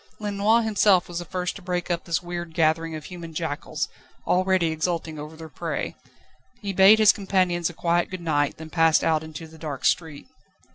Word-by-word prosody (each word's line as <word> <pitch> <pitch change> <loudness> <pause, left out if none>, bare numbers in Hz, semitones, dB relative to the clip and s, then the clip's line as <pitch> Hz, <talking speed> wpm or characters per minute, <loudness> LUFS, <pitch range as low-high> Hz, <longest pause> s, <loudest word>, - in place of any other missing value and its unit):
Lenoir 210 +2 +2
himself 205 -4 +3
was 175 -1 -4
the 175 - -6
first 180 0 -3
to - - -12
break 180 -1 -2
up 170 -1 -2
this 170 0 -1
weird 175 -2 -6
gathering 160 0 +1
of 155 -1 -8
human 170 -3 -9
jackals, 155 -3 -3 0.4
already 185 -2 +2
exulting 160 -1 -2
over 150 +2 -8
their 160 0 -9
prey. - - -4 0.7
He 200 -3 -4
bad 195 +3 +7
his 215 -1 +7
companions 185 -4 0
a - - -9
quiet 170 0 0
good 185 - -6
night, 145 -4 0
then 160 0 -10
passed 165 -2 +4
out 160 -1 +2
into 160 +1 -8
the 160 0 -15
dark 150 -4 -5
street. 160 -4 0
170 Hz, 190 wpm, -25 LUFS, 160-185 Hz, 0.7 s, bad